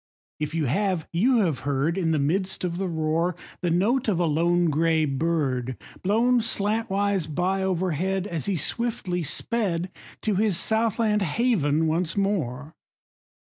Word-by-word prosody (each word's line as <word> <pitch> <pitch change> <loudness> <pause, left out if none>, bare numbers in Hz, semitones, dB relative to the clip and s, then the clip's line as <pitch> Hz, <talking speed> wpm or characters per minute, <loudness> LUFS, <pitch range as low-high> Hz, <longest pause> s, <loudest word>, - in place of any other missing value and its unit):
If 150 +1 -3
you 160 -2 +1
have, 180 - 0
you 230 +7 +3
have 165 -8 0
heard 140 +4 0
In 180 -4 0
the 160 - +2
midst 185 +8 0
of 175 -1 -2
the 195 - -1
roar, 165 +1 0 0.3
The 175 - 0
note 225 +10 +1
of 190 -5 +1
a 175 - +2
lone 170 +2 +2
gray 160 +1 +2
bird, 135 -4 -1 0.2
Blown 235 +6 +3
slantwise 205 -4 0
by 180 +5 0
overhead 185 0 0
As 170 -5 -4
he 200 - +1
swiftly 180 - -1
sped 180 - -1 0.3
To 215 - +1
his 200 -2 +2
south 220 +2 +1
land 215 -3 +2
haven 160 - +1
once 165 +3 -1
more 155 -8 -1
180 Hz, 150 wpm, -25 LUFS, 155-205 Hz, 0.3 s, you